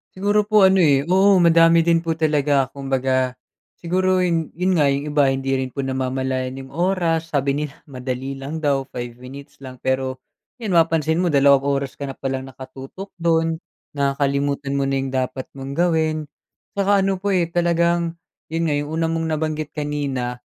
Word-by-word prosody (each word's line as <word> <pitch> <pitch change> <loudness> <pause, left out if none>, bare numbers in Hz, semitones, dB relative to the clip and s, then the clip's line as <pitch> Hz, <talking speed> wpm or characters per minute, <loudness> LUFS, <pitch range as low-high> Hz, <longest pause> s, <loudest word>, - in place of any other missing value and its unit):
Siguro 205 +2 +2
po 210 -2 +5
ano 190 -1 +4
eh, 140 -1 +3
oo 190 +2 +5
madami 165 -1 +5
din 165 -1 +3
po 165 - -1
talaga 145 -3 +2
kumbaga, 130 -1 0 0.5
siguro 185 +2 +1
'yun 170 -3 0
'yun 180 +2 0
nga 145 -4 +3
yung 140 +2 -2
iba 145 -2 +3
hindi 135 0 -1
rin 130 -1 -2
po 140 - -9
namamalayan 130 0 -2
yung 135 - -9
oras, 165 -1 0
sabi 140 -1 +1
nila 150 0 -5
madali 130 0 -5
lang 140 +4 -6
daw, 140 -3 +1
5 120 -1 -6
minutes 135 +3 -12
lang, 130 -1 -9
pero, 130 0 -1 0.4
'yan 210 -6 -2
mapansin 165 -1 +3
mo 175 - +1
2 140 -1 +5
oras 140 -1 -1
ka - - -7
na 140 - -4
palang 135 0 -4
nakatutok 135 - -10 0.2
doon, 165 -1 +2 0.4
nakakalimutan 140 0 0
mo 140 - +1
na 135 0 0 0.2
dapat 130 +1 -6
mong 135 0 -6
gawin. 160 -3 +1 0.5
'Tsaka 200 0 +3
ano 195 0 +1
po 200 +2 -2
eh, 180 -3 +2
talagang 170 0 +1 0.3
'yun 165 0 0
nga 150 - +1
yong 145 - -7
una 165 +1 0
mong 165 0 -1
nabanggit 155 -1 -2
kanina, 140 -5 -3
145 Hz, 170 wpm, -21 LUFS, 135-170 Hz, 0.5 s, po